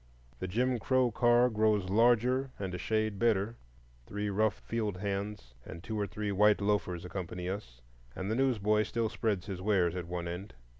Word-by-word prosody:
The 95 Hz, -, -3 dB
"Jim 125 Hz, +6 st, +1 dB
Crow 130 Hz, 0 st, +2 dB
Car" 120 Hz, +2 st, +4 dB
grows 110 Hz, -4 st, +2 dB
larger 120 Hz, +4 st, +3 dB
and 95 Hz, -2 st, -4 dB
a 90 Hz, -, -4 dB
shade 110 Hz, -1 st, -1 dB
better; 115 Hz, -1 st, +2 dB, 0.5 s
three 105 Hz, 0 st, -3 dB
rough 105 Hz, +1 st, +2 dB
field 110 Hz, -5 st, -3 dB
hands 100 Hz, -8 st, -4 dB
and 85 Hz, +5 st, -9 dB
two 110 Hz, -1 st, -3 dB
or 100 Hz, -, 0 dB
three 105 Hz, 0 st, -3 dB
white 105 Hz, +2 st, +4 dB
loafers 100 Hz, -4 st, 0 dB
accompany 90 Hz, -1 st, -5 dB
us, 95 Hz, -, -6 dB, 0.3 s
and 95 Hz, +2 st, -3 dB
the -, -, +1 dB
newsboy 110 Hz, -5 st, +2 dB
still 110 Hz, +1 st, -1 dB
spreads 105 Hz, -5 st, -1 dB
his 95 Hz, -3 st, -5 dB
wares 90 Hz, -4 st, +2 dB
at 90 Hz, -2 st, -4 dB
one 85 Hz, 0 st, -4 dB
end. 90 Hz, +2 st, -6 dB
105 Hz, 180 wpm, -31 LUFS, 95-110 Hz, 0.5 s, Car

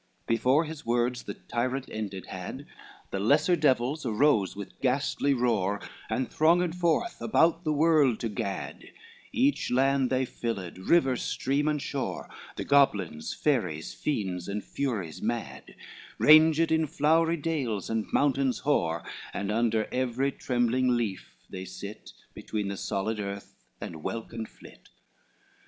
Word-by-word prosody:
XVIII -, -, -41 dB
Before 130 Hz, +7 st, +3 dB
his 155 Hz, -1 st, -8 dB
words 120 Hz, +1 st, 0 dB
the -, -, -5 dB
tyrant 130 Hz, +3 st, -3 dB
ended 100 Hz, -4 st, -5 dB
had, -, -, -7 dB, 0.5 s
The 95 Hz, -, -2 dB
lesser 145 Hz, -, +4 dB
devils 145 Hz, -1 st, +1 dB
arose 115 Hz, -3 st, +2 dB
with 100 Hz, -1 st, -9 dB
ghastly 140 Hz, +1 st, +1 dB
roar, 105 Hz, -5 st, +1 dB, 0.3 s
And 130 Hz, -, -1 dB
thronged 170 Hz, +2 st, +3 dB
forth 180 Hz, -, 0 dB
about 165 Hz, -4 st, +3 dB
the 155 Hz, -, 0 dB
world 150 Hz, -5 st, +3 dB
to 115 Hz, -, -1 dB
gad, 100 Hz, -1 st, -4 dB, 0.5 s
Each 275 Hz, +4 st, +1 dB
land 135 Hz, +1 st, +2 dB
they 130 Hz, 0 st, +1 dB
filled, 100 Hz, -8 st, -5 dB
river, 135 Hz, -, +3 dB
stream 140 Hz, +5 st, -1 dB
and 150 Hz, -1 st, +1 dB
shore, 140 Hz, -1 st, -4 dB, 0.3 s
The -, -, -4 dB
goblins, 100 Hz, -, +2 dB
fairies, 90 Hz, -, -1 dB
fiends 95 Hz, -, -2 dB
and 100 Hz, +1 st, -3 dB
furies 110 Hz, -, -3 dB
mad, -, -, -4 dB, 0.4 s
Ranged 160 Hz, +1 st, +6 dB
in 160 Hz, -1 st, +2 dB
flowery 160 Hz, +4 st, +2 dB
dales, 140 Hz, -, -2 dB
and 115 Hz, -1 st, -2 dB
mountains 135 Hz, -2 st, +2 dB
hoar, 85 Hz, -, +1 dB, 0.3 s
And 100 Hz, 0 st, -2 dB
under 110 Hz, -1 st, +1 dB
every 130 Hz, +2 st, 0 dB
trembling 125 Hz, 0 st, +1 dB
leaf 100 Hz, -6 st, -4 dB
they 95 Hz, 0 st, -7 dB
sit, 100 Hz, +3 st, -9 dB, 0.2 s
Between 105 Hz, -2 st, -4 dB
the 100 Hz, -, -4 dB
solid 105 Hz, +4 st, -2 dB
earth 100 Hz, 0 st, -5 dB, 0.3 s
and 80 Hz, -2 st, -7 dB
welkin 115 Hz, +3 st, -5 dB
flit. -, -, -17 dB
125 Hz, 140 wpm, -28 LUFS, 105-150 Hz, 0.5 s, Ranged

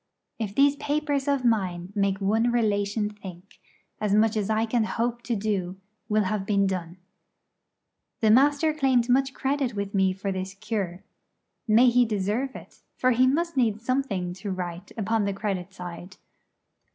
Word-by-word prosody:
If 205 Hz, -3 st, -4 dB
these 280 Hz, +1 st, +4 dB
papers 290 Hz, -1 st, -1 dB
of 280 Hz, -3 st, +1 dB
mine 190 Hz, -5 st, 0 dB
make 200 Hz, -1 st, +1 dB
one 220 Hz, +4 st, +2 dB
relation 210 Hz, -2 st, +1 dB
think, 190 Hz, -2 st, -12 dB, 0.4 s
as 210 Hz, -1 st, +1 dB
much 220 Hz, +1 st, +3 dB
as 210 Hz, -2 st, -1 dB
I 220 Hz, +1 st, +2 dB
can 230 Hz, 0 st, +1 dB
hope 235 Hz, +2 st, -2 dB
to 240 Hz, -1 st, -2 dB
do 195 Hz, -3 st, -2 dB, 0.3 s
will 215 Hz, 0 st, +3 dB
have 200 Hz, +1 st, -1 dB
been 200 Hz, 0 st, +2 dB
done. 180 Hz, -2 st, -3 dB, 1.2 s
The 220 Hz, -1 st, +4 dB
Master 290 Hz, +5 st, +4 dB
claimed 260 Hz, -5 st, +2 dB
much 265 Hz, +1 st, +2 dB
credit 270 Hz, -3 st, -1 dB
with 200 Hz, 0 st, -3 dB
me 190 Hz, -1 st, +3 dB
for 195 Hz, +1 st, -3 dB
this 190 Hz, 0 st, -4 dB
cure. 200 Hz, -4 st, -4 dB, 0.6 s
May 235 Hz, +3 st, +6 dB
he 245 Hz, +1 st, +5 dB
deserve 215 Hz, +5 st, -2 dB
it! -, -, -12 dB, 0.2 s
for 255 Hz, -, +3 dB
he 255 Hz, +2 st, +4 dB
must 335 Hz, +5 st, 0 dB
need 225 Hz, -5 st, +1 dB
something 230 Hz, -8 st, -1 dB
to 205 Hz, -, -4 dB
write 180 Hz, 0 st, -5 dB
upon 220 Hz, 0 st, 0 dB
the 200 Hz, -, -1 dB
credit 195 Hz, -2 st, -3 dB
side. 180 Hz, 0 st, -9 dB
215 Hz, 165 wpm, -26 LUFS, 195-245 Hz, 1.2 s, May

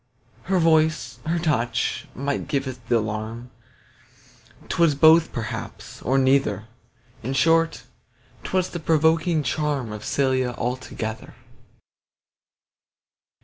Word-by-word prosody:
Her 190 Hz, +1 st, +1 dB
voice, 160 Hz, -2 st, +2 dB
her 170 Hz, +2 st, +1 dB
touch, 150 Hz, -8 st, -1 dB
might 140 Hz, +2 st, -2 dB
give 140 Hz, -1 st, -1 dB
th' 125 Hz, -3 st, -8 dB
alarm 110 Hz, +2 st, -2 dB, 1.2 s
'Twas 165 Hz, -4 st, +2 dB
both 160 Hz, +3 st, +6 dB
perhaps, 115 Hz, -4 st, -6 dB
or 130 Hz, +5 st, +1 dB
neither; 130 Hz, -6 st, +2 dB, 0.6 s
In 130 Hz, +4 st, -3 dB
short, 165 Hz, +4 st, +2 dB, 0.6 s
'twas 185 Hz, -1 st, 0 dB
that 170 Hz, -3 st, -6 dB
provoking 160 Hz, 0 st, +2 dB
charm 140 Hz, -4 st, -1 dB
Of 105 Hz, -1 st, -7 dB
Cælia 130 Hz, -1 st, 0 dB
altogether. 120 Hz, -3 st, -4 dB
135 Hz, 100 wpm, -23 LUFS, 120-160 Hz, 1.2 s, both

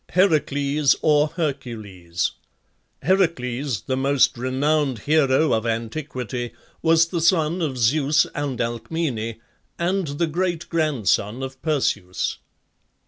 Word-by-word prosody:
HERACLES 150 Hz, -5 st, +2 dB
(HERCULES). 130 Hz, -, -1 dB, 0.7 s
Heracles, 140 Hz, -, +1 dB
the 130 Hz, -, -2 dB
most 135 Hz, 0 st, +3 dB
renowned 135 Hz, +2 st, 0 dB
hero 150 Hz, +3 st, +3 dB
of 110 Hz, +1 st, 0 dB
antiquity, 120 Hz, +1 st, -3 dB, 0.3 s
was 165 Hz, 0 st, +4 dB
the 170 Hz, -2 st, -2 dB
son 170 Hz, 0 st, +2 dB
of 140 Hz, -6 st, -2 dB
Zeus 140 Hz, +5 st, +3 dB
and 145 Hz, -4 st, -3 dB
Alcmene, 115 Hz, 0 st, -2 dB, 0.4 s
and 180 Hz, +1 st, 0 dB
the 145 Hz, +4 st, -1 dB
great 170 Hz, +1 st, -2 dB
grandson 135 Hz, -, 0 dB
of 130 Hz, 0 st, -7 dB
Perseus. 135 Hz, -, -1 dB
140 Hz, 100 wpm, -23 LUFS, 120-160 Hz, 0.7 s, was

